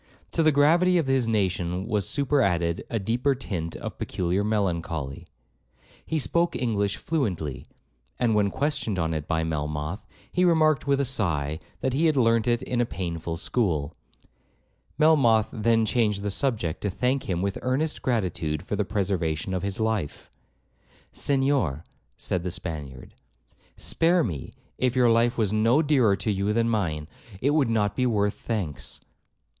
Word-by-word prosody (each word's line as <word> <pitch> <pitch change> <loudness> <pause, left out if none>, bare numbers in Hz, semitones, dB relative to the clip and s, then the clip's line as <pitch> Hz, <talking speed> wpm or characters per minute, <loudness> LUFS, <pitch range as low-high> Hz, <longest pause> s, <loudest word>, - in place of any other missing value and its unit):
To - - +1
the 155 -1 +5
gravity 170 +6 +4
of 165 - +1
his 135 -3 +1
nation 95 -4 0
was 105 -4 -1
super 140 0 +2
added 85 -4 +1
a 115 - -1
deeper 120 +7 0
tint 90 -10 -4
of - - -7
peculiar 90 +3 -1
melancholy. 85 -9 -2 0.8
He 160 - -2
spoke 170 +4 +1
English 100 -5 0
fluently; 90 - -2 0.5
and 115 -2 +2
when 105 -1 +3
questioned 135 -5 -1
on 80 -2 0
it 75 -1 -4
by 80 -1 0
Melmoth, 75 +3 -3 0.3
he 180 - +1
remarked 155 -5 +3
with 140 0 +3
a - - +1
sigh, 80 - -1 0.2
that 130 - 0
he 160 +5 +3
had 155 -3 +2
learnt 115 -2 +3
it 120 0 +1
in 120 -1 -1
a - - +2
painful 85 -4 -4
school. 80 -8 -1 1.0
Melmoth 135 -9 +4
then 115 0 +2
changed 105 -3 +1
the 105 - -1
subject, 105 - -1
to 100 - -1
thank 125 +7 -1
him 90 0 0
with 100 -1 -2
earnest 140 +5 -1
gratitude 85 -10 -1
for - - -3
the 105 - +1
preservation 95 -4 -1
of 90 - -1
his 100 +1 -3
life. 110 -9 -2 0.8
'Senhor,' 135 - +1 0.3
said 90 - -2
the 90 - -3
Spaniard, 80 -8 -6 0.6
'spare 170 +1 +2
me; 80 - -4 0.3
if 130 -1 +1
your 125 -2 +4
life 115 +1 +2
was 105 -3 +1
no 115 +8 +3
dearer 130 -9 +3
to 105 - -1
you 100 +1 0
than 115 +1 +2
mine, 85 -10 -1 0.3
it 140 +6 +2
would 145 -5 +2
not 105 -3 +1
be 125 -1 +1
worth 105 -3 +1
thanks.' 95 -11 -4
105 Hz, 160 wpm, -26 LUFS, 85-130 Hz, 1.0 s, the